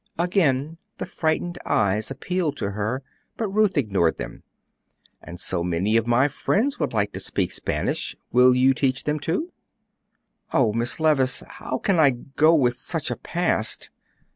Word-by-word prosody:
Again 165 Hz, -4 st, +1 dB, 0.2 s
the -, -, -4 dB
frightened 170 Hz, +2 st, -2 dB
eyes 105 Hz, 0 st, +1 dB
appealed 150 Hz, +2 st, -2 dB
to 100 Hz, -, -2 dB
her; 105 Hz, +6 st, -3 dB, 0.3 s
but 220 Hz, -3 st, -2 dB
Ruth 210 Hz, -4 st, +2 dB
ignored 95 Hz, -, +1 dB
them. -, -, -7 dB, 0.8 s
"And 85 Hz, +2 st, -10 dB
so 85 Hz, -2 st, -1 dB
many 90 Hz, +5 st, 0 dB
of 115 Hz, 0 st, +2 dB
my 120 Hz, +4 st, +4 dB
friends 220 Hz, -, 0 dB
would 150 Hz, -, -1 dB
like 105 Hz, -2 st, 0 dB
to -, -, -5 dB
speak -, -, -1 dB
Spanish. -, -, -2 dB, 0.2 s
Will 125 Hz, +1 st, +6 dB
you 130 Hz, +1 st, +4 dB
teach 130 Hz, 0 st, 0 dB
them 150 Hz, 0 st, -1 dB
too?" 175 Hz, -, -2 dB, 1.0 s
"Oh, 115 Hz, -6 st, +2 dB
Miss 120 Hz, +5 st, -1 dB
Levice, 145 Hz, -5 st, +2 dB
how 130 Hz, -, -5 dB
can 190 Hz, +2 st, +1 dB
I 150 Hz, -3 st, +7 dB
go 140 Hz, +6 st, +2 dB
with 125 Hz, -5 st, +2 dB
such 160 Hz, +3 st, -3 dB
a -, -, -1 dB
past?" 165 Hz, -11 st, -1 dB
135 Hz, 160 wpm, -24 LUFS, 115-160 Hz, 1.0 s, I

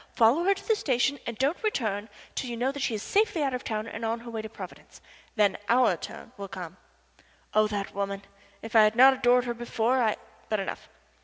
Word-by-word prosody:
Follow 250 Hz, +9 st, +4 dB
her 395 Hz, +1 st, +4 dB
to -, -, -12 dB
the 445 Hz, -, +4 dB
station, 275 Hz, -, +1 dB
and 235 Hz, -2 st, -4 dB
don't 280 Hz, +6 st, 0 dB
return 220 Hz, -, -1 dB, 0.2 s
till 255 Hz, -, -3 dB
you 235 Hz, -, -4 dB
know 260 Hz, +3 st, 0 dB
she 270 Hz, -5 st, -1 dB
is 205 Hz, -, -4 dB
safely 405 Hz, -7 st, +2 dB
out 270 Hz, -2 st, 0 dB
of 250 Hz, -, -3 dB
town 215 Hz, -1 st, -3 dB
and 225 Hz, 0 st, -7 dB
on 230 Hz, +1 st, -1 dB
her 235 Hz, 0 st, -9 dB
way 225 Hz, -1 st, -3 dB
to 220 Hz, -, -7 dB
Providence. -, -, -11 dB, 0.4 s
Then 205 Hz, -3 st, +2 dB
our 240 Hz, -5 st, +4 dB
turn -, -, -9 dB
will 200 Hz, 0 st, -6 dB
come." 185 Hz, -2 st, -8 dB, 0.8 s
Oh, 215 Hz, 0 st, +4 dB
that 205 Hz, -2 st, -4 dB
woman! 200 Hz, 0 st, -3 dB, 0.4 s
If 225 Hz, +1 st, -7 dB
I 220 Hz, -, +9 dB
had 215 Hz, +1 st, +4 dB
not 265 Hz, +3 st, +8 dB
adored 250 Hz, -1 st, +3 dB
her 240 Hz, -, -1 dB
before 240 Hz, +1 st, 0 dB
I 220 Hz, -3 st, +2 dB, 0.3 s
but 215 Hz, -, +1 dB
enough. 195 Hz, -, -5 dB
230 Hz, 220 wpm, -28 LUFS, 215-260 Hz, 0.8 s, I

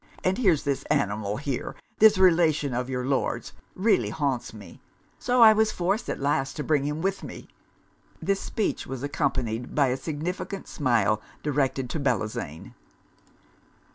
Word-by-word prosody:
And 185 Hz, +4 st, +1 dB
here's 180 Hz, -, +3 dB
this 140 Hz, -1 st, -1 dB
animal 105 Hz, -7 st, 0 dB
here, 140 Hz, -3 st, -4 dB, 0.2 s
this 215 Hz, -1 st, +7 dB
relation 165 Hz, -6 st, +3 dB
of 125 Hz, +1 st, -2 dB
your 125 Hz, -1 st, -2 dB
Lord's, 135 Hz, 0 st, -1 dB, 0.2 s
really 185 Hz, -, +2 dB
haunts 135 Hz, 0 st, -2 dB
me; 105 Hz, -3 st, -13 dB, 0.4 s
so 245 Hz, -1 st, +4 dB
I 220 Hz, -1 st, +9 dB
was 220 Hz, 0 st, +2 dB
forced 195 Hz, +6 st, -1 dB
at -, -, -3 dB
last 135 Hz, -1 st, 0 dB
to 150 Hz, -, -3 dB
bring 145 Hz, -3 st, +1 dB
him 150 Hz, +3 st, -3 dB
with 195 Hz, 0 st, -1 dB
me.' -, -, -9 dB, 0.7 s
This 195 Hz, +4 st, 0 dB
speech 215 Hz, -, -2 dB
was 130 Hz, -1 st, -6 dB
accompanied 130 Hz, -5 st, -2 dB
by 140 Hz, -3 st, +3 dB
a 125 Hz, -, 0 dB
significant 180 Hz, +6 st, -5 dB
smile 115 Hz, -7 st, +1 dB, 0.2 s
directed 135 Hz, -3 st, 0 dB
to 160 Hz, -, -2 dB
Bellozane. 105 Hz, -, -3 dB
145 Hz, 150 wpm, -26 LUFS, 125-180 Hz, 0.7 s, I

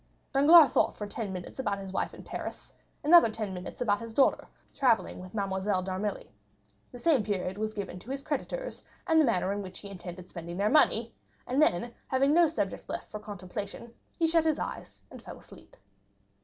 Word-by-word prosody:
Danglars 295 Hz, +3 st, +8 dB
thought -, -, +2 dB
for 210 Hz, -, -4 dB
ten 205 Hz, 0 st, -5 dB
minutes 185 Hz, +6 st, -7 dB
about 205 Hz, -6 st, -1 dB
his 195 Hz, -1 st, -7 dB
wife -, -, -1 dB
in -, -, -12 dB
Paris; -, -, -7 dB, 0.3 s
another 330 Hz, -4 st, +7 dB
ten 215 Hz, -3 st, -4 dB
minutes 180 Hz, +5 st, -8 dB
about 205 Hz, -4 st, +2 dB
his 230 Hz, -1 st, -8 dB
daughter 275 Hz, -, +3 dB, 0.3 s
travelling 250 Hz, -5 st, +1 dB
with 185 Hz, +3 st, -10 dB
Mademoiselle 195 Hz, -1 st, 0 dB
d'Armilly; 190 Hz, -, -4 dB, 0.6 s
the -, -, -9 dB
same 290 Hz, -1 st, +3 dB
period 195 Hz, -3 st, -2 dB
was 215 Hz, 0 st, -2 dB
given 190 Hz, -3 st, -5 dB
to 215 Hz, -, -14 dB
his 275 Hz, +1 st, -4 dB
creditors, -, -, -4 dB, 0.2 s
and 320 Hz, -2 st, +5 dB
the -, -, +4 dB
manner 195 Hz, -5 st, +1 dB
in 205 Hz, -, -3 dB
which 185 Hz, -1 st, -8 dB
he 200 Hz, -, -9 dB
intended 180 Hz, -1 st, -9 dB
spending 170 Hz, 0 st, -7 dB
their 205 Hz, +2 st, +1 dB
money; 235 Hz, -6 st, +3 dB, 0.3 s
and 265 Hz, +4 st, +1 dB
then, 235 Hz, -, +2 dB
having 270 Hz, +2 st, +2 dB
no 340 Hz, 0 st, +6 dB
subject 315 Hz, -, -3 dB
left -, -, -5 dB
for 210 Hz, -, -5 dB
contemplation, 205 Hz, +2 st, -7 dB, 0.2 s
he 330 Hz, -, +2 dB
shut 325 Hz, 0 st, +3 dB
his 315 Hz, -2 st, +1 dB
eyes, -, -, -6 dB
and -, -, -10 dB
fell -, -, -10 dB
asleep. -, -, -16 dB
215 Hz, 195 wpm, -29 LUFS, 190-275 Hz, 0.6 s, Danglars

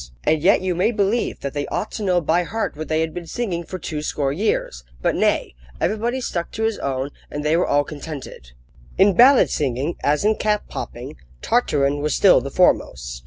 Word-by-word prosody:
And 155 Hz, -1 st, +2 dB
yet 185 Hz, +4 st, +4 dB
you 185 Hz, -1 st, -1 dB
may 180 Hz, +6 st, +1 dB
believe 210 Hz, +1 st, 0 dB
that 140 Hz, -, -4 dB
they 145 Hz, -1 st, -3 dB
ought 210 Hz, -, -3 dB
to -, -, -6 dB
know 180 Hz, -3 st, +2 dB
by 165 Hz, +3 st, +2 dB
heart 220 Hz, +3 st, -3 dB
what 155 Hz, +1 st, -6 dB
they 160 Hz, 0 st, +1 dB
had 160 Hz, -1 st, -2 dB
been 175 Hz, -1 st, -7 dB
singing 185 Hz, -7 st, -3 dB
for 185 Hz, -, -7 dB
two 155 Hz, -3 st, -5 dB
score 140 Hz, -2 st, -1 dB
years! 155 Hz, -, -1 dB, 0.2 s
But, -, -, +1 dB
nay! -, -, +1 dB, 0.3 s
everybody 230 Hz, +7 st, -1 dB
stuck 170 Hz, -7 st, -3 dB
to 220 Hz, -, -3 dB
his 225 Hz, -1 st, 0 dB
own, 135 Hz, 0 st, -2 dB, 0.2 s
and 145 Hz, 0 st, -5 dB
they 155 Hz, +2 st, +3 dB
were 175 Hz, -, +2 dB
all 145 Hz, 0 st, +3 dB
contented. 145 Hz, -, -9 dB, 0.4 s
In 195 Hz, +1 st, +5 dB
ballad 255 Hz, +7 st, +6 dB
singing, 140 Hz, +3 st, -1 dB
as 150 Hz, +6 st, +1 dB
in 215 Hz, 0 st, +3 dB
cap 210 Hz, -1 st, 0 dB
popping, -, -, -7 dB, 0.3 s
Tartarin 145 Hz, -, +1 dB
was 150 Hz, -1 st, 0 dB
still -, -, +5 dB
the -, -, -5 dB
foremost. 60 Hz, -1 st, +1 dB
165 Hz, 205 wpm, -21 LUFS, 145-205 Hz, 0.4 s, ballad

